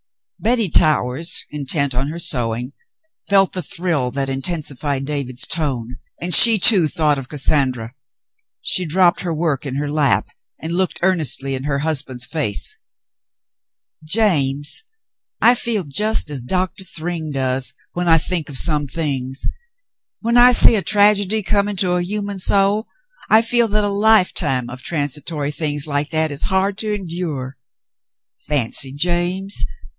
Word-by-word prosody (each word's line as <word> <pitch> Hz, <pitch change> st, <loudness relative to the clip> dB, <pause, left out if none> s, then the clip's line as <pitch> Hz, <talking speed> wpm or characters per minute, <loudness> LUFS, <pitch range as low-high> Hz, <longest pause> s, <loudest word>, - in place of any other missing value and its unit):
Betty 230 Hz, -3 st, 0 dB
Towers, 155 Hz, 0 st, +1 dB
intent 140 Hz, -1 st, -1 dB
on 130 Hz, +3 st, -2 dB
her 160 Hz, +3 st, -7 dB
sewing, 125 Hz, -4 st, -2 dB, 0.6 s
felt 195 Hz, -1 st, +3 dB
the 185 Hz, -, -1 dB
thrill 165 Hz, -8 st, -1 dB
that 135 Hz, +1 st, -3 dB
intensified 140 Hz, -1 st, -3 dB
David's 135 Hz, -4 st, -3 dB
tone, 125 Hz, -7 st, -3 dB, 0.2 s
and 175 Hz, +1 st, 0 dB
she, 225 Hz, +7 st, +11 dB
too, 190 Hz, -4 st, +8 dB
thought 150 Hz, -2 st, 0 dB
of 135 Hz, -, -11 dB
Cas 145 Hz, -3 st, -2 dB
sandra. 130 Hz, -5 st, 0 dB, 0.7 s
She 185 Hz, -, +1 dB
dropped 175 Hz, +2 st, +2 dB
her 170 Hz, -3 st, -4 dB
work 150 Hz, -4 st, -2 dB
in 130 Hz, -, -5 dB
her 145 Hz, +1 st, -3 dB
lap 140 Hz, -10 st, 0 dB, 0.3 s
and 160 Hz, +2 st, -6 dB
looked 185 Hz, 0 st, -1 dB
earnestly 155 Hz, -7 st, 0 dB
in 130 Hz, +1 st, -5 dB
her 145 Hz, -1 st, -2 dB
husband's 130 Hz, -6 st, -1 dB
face. 140 Hz, -11 st, -1 dB, 1.2 s
"James, 150 Hz, -7 st, 0 dB, 0.6 s
I 240 Hz, -, +5 dB
feel 230 Hz, -4 st, -2 dB
just 190 Hz, +4 st, +1 dB
as 140 Hz, -3 st, -4 dB
Doctor 185 Hz, +8 st, -4 dB
Thryng 165 Hz, -2 st, -5 dB
does 130 Hz, -1 st, -3 dB
— -, -, -44 dB
when 175 Hz, 0 st, -3 dB
I 165 Hz, -1 st, +5 dB
think 165 Hz, -1 st, -2 dB
of 135 Hz, -, -3 dB
some 150 Hz, 0 st, 0 dB
things. 135 Hz, -4 st, -3 dB, 0.8 s
When 235 Hz, +1 st, 0 dB
I 245 Hz, +1 st, +7 dB
see 235 Hz, -, +7 dB
a 205 Hz, -, 0 dB
tragedy 205 Hz, +1 st, +1 dB
coming 200 Hz, +1 st, -1 dB
to 180 Hz, -1 st, -1 dB
a 180 Hz, 0 st, 0 dB
human 200 Hz, +1 st, -4 dB
soul, 200 Hz, +3 st, +2 dB, 0.4 s
I 220 Hz, +1 st, +4 dB
feel 235 Hz, 0 st, +1 dB
that 210 Hz, 0 st, -1 dB
a -, -, 0 dB
lifetime 200 Hz, -, +1 dB
of 130 Hz, +1 st, -9 dB
transitory 145 Hz, 0 st, -3 dB
things 145 Hz, -2 st, -2 dB
like 145 Hz, 0 st, -3 dB
that 160 Hz, -1 st, 0 dB
is 145 Hz, -, -6 dB
hard 190 Hz, +1 st, -1 dB
to 215 Hz, -1 st, -3 dB
endure. 165 Hz, -9 st, -5 dB, 0.8 s
Fancy, 135 Hz, -1 st, 0 dB
James 175 Hz, +6 st, -1 dB
155 Hz, 150 wpm, -18 LUFS, 140-190 Hz, 1.2 s, she